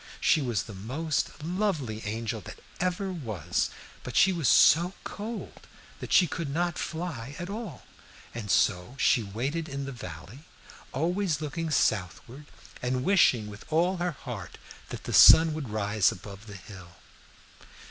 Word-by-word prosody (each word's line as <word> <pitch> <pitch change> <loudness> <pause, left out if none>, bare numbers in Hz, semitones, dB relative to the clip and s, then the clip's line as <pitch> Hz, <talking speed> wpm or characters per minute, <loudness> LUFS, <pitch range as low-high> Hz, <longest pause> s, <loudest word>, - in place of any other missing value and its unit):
She 155 - +3
was 120 -7 -1
the 110 - -10
most 140 +10 -3
lovely 165 - -1
angel 110 0 -3
that - - -10 0.2
ever 185 +2 -1
was, 105 - -2 0.3
but - - -8
she 190 - +5
was 165 -7 +1
so 175 +5 +5
cold 220 +3 -7 0.3
that - - -7
she 180 - +6
could 165 -1 -4
not 170 +3 -1
fly 155 -6 -5
at 175 +3 -5
all, 210 - -7 0.5
and 115 -3 -6
so 95 +5 +1
she 125 - +3
waited 135 +11 -3
in 140 0 -4
the 140 - -5
valley, 95 - -9 0.5
always 170 +2 0
looking 160 +2 -3
southward 115 - -1 0.3
and 125 +1 -1
wishing 140 - +4
with 105 0 -10
all 175 +4 +2
her 175 -1 -1
heart 120 -9 -8 0.3
that - - -7
the - - -5
sun 160 -1 +9
would 150 -6 -5
rise 105 -1 +2
above 100 +3 -10
the 100 - -9
hill. 95 -2 -12
140 Hz, 150 wpm, -28 LUFS, 110-170 Hz, 0.5 s, sun